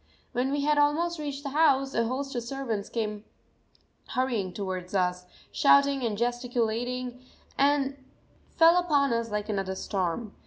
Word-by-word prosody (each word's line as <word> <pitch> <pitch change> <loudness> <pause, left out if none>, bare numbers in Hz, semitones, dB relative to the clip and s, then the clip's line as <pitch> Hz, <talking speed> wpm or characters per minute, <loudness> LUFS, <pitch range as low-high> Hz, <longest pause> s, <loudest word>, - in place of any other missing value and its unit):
When 255 +2 0
we 285 0 0
had 295 +1 +2
almost 320 +3 +1
reached 285 -2 -5
the 280 - -3
house, 275 -2 +3
a 230 -1 +1
host 270 +3 -3
of 240 - -2
servants 235 -4 -4
came 210 -2 -3 0.8
hurrying 245 -8 -1
towards 185 -1 -5
us, 180 -1 0 0.2
shouting 280 -1 +4
and 220 -3 -1
gesticulating, 245 +1 -2 0.3
and 280 -1 +1 0.5
fell 330 +1 +7
upon 285 -7 +2
us 230 0 -1
like 210 0 -3
another 195 -3 -2
storm. 195 +3 -3
250 Hz, 145 wpm, -28 LUFS, 210-280 Hz, 0.8 s, fell